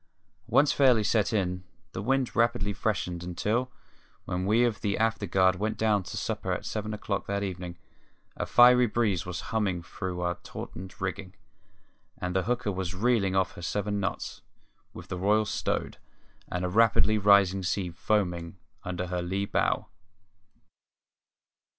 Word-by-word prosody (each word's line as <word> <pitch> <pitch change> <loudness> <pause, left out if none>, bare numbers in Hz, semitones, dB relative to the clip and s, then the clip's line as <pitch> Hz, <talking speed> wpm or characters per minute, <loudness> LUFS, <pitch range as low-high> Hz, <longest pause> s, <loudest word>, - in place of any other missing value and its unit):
Once 145 +1 +4
fairly 125 -6 +4
set 105 -1 +2
in, 90 -4 -1 0.3
the - - -5
wind 130 +3 0
rapidly 115 -4 +2
freshened 90 -4 -2
until, 105 +8 -1 0.5
when 90 +1 -2
we 110 +4 +4
of 115 -5 -1
the 100 -1 0
afterguard 95 -5 +2
went 110 +3 -2
down 105 -2 +2
to - - -7
supper - - -2
at - - -2
seven 110 0 -3
o'clock 105 -2 -3
that 100 0 -1
evening, 90 -2 -5 0.6
a - - -3
fiery 125 0 +7
breeze 105 -6 0
was 90 -1 -4
humming 95 -6 0
through 95 -2 -5
our 90 -1 -2
tautened 95 +1 -8
rigging, 95 +1 -4 0.8
and 90 0 -4
the 95 - +1
hooker 120 -2 0
was 95 -1 -3
reeling 100 -2 +2
off 95 -1 +2
her - - -11
seven 105 +3 -2
knots, 100 - -4 0.5
with - - -11
the 90 - -5
royal 105 +3 +3
stowed, 105 - -2 0.5
and 90 0 -1
a - - -1
rapidly 110 +1 +4
rising 100 -2 +5
sea 90 0 -1
foaming 90 -2 -1 0.3
under 90 0 -3
her 90 0 -2
lee 95 +3 -2
bow. - - 0
100 Hz, 150 wpm, -28 LUFS, 90-110 Hz, 0.8 s, fiery